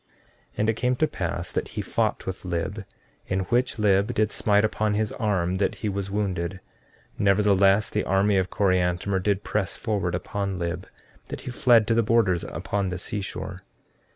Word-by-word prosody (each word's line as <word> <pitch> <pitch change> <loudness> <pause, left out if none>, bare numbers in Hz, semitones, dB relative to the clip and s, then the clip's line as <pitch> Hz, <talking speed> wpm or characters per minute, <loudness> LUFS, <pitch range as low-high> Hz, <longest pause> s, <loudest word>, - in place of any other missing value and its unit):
14:12 - - -43 0.5
And 105 +1 +1
it - - -4
came 125 +1 +1
to 155 +5 +2
pass 85 - -3
that - - -2
he - - +1
fought - - -1
with 95 -1 -5
Lib, 95 +3 -3 0.4
in 95 0 0
which 125 +1 +1
Lib 100 +1 +3
did 110 -1 +2
smite 105 0 +3
upon 110 -1 0
his 110 0 0
arm 95 -5 0
that 100 - 0
he - - +1
was 100 -1 -3
wounded; 95 -3 -2 0.6
nevertheless, 100 0 +4
the - - -1
army 100 +1 +3
of 95 -1 +1
Coriantumr 95 0 +1
did 100 +1 0
press 105 -3 -2
forward 100 -6 -1
upon 100 +1 -3
Lib, 90 +2 -3 0.4
that - - -6
he 125 - -6
fled 120 -4 +4
to 115 - +1
the 115 - +4
borders 105 -6 +2
upon 100 +2 -2
the 90 - -3
seashore. 95 -1 -4
100 Hz, 180 wpm, -25 LUFS, 95-105 Hz, 0.6 s, nevertheless